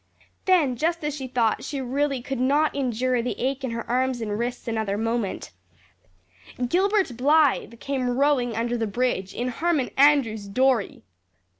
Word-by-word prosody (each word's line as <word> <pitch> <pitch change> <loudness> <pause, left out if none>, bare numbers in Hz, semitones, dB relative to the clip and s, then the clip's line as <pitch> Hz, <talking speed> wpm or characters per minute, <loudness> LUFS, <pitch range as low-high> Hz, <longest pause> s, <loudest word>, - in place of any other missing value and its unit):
Then, 315 -10 +3
just 335 +3 -1
as 295 -1 -2
she 265 -3 -5
thought 235 -3 0
she 280 - -4
really 270 0 -1
could 270 -1 -4
not 285 +4 +2
endure 255 -2 0
the 245 - -3
ache 270 +2 -1
in 260 - -1
her 230 0 -5
arms 255 0 0
and 210 -2 -3
wrists 245 +1 -4
another 220 -3 -1
moment, 225 -2 -2 1.2
Gilbert 380 - +1
Blythe 275 -3 +2
came 265 -3 -2
rowing 265 -5 +2
under 235 +1 -1
the 225 - 0
bridge 205 -4 -1
in 245 +1 -2
Harmon 305 +1 0
Andrews's 265 -8 +3
dory! 245 - +1
255 Hz, 155 wpm, -24 LUFS, 235-280 Hz, 1.2 s, Then